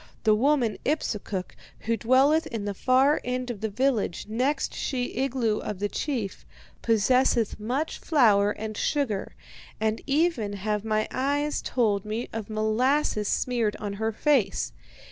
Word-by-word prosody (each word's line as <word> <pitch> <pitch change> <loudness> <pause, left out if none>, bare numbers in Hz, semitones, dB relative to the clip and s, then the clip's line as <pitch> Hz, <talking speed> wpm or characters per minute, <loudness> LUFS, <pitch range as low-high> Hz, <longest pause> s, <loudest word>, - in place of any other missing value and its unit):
The 215 - +5
woman 245 0 +2
Ipsukuk, 210 -10 -2 0.3
who 230 +1 0
dwelleth 270 +7 +3
in 220 -3 -4
the 205 - -2
far 265 +8 +3
end 250 0 -2
of 210 - -8
the 220 - -1
village 225 -5 0
next 260 +6 0
she 250 -2 -2
igloo 245 -4 0
of 210 - -5
the 205 +2 -2
chief, 235 -9 -3 0.4
possesseth 230 0 +2
much 255 +9 -2
flour 215 - +4
and 215 +1 -4
sugar, 230 -6 -1 0.4
and 220 0 0
even 275 -8 +1
have 210 +1 -2
my 215 -1 0
eyes 285 +3 0
told 210 -6 0
me 220 +3 -4
of 225 -2 -5
molasses 220 +2 +1
smeared 235 -4 0
on 205 -1 -5
her 220 0 +1
face. 225 -4 +1
230 Hz, 145 wpm, -26 LUFS, 210-265 Hz, 0.4 s, The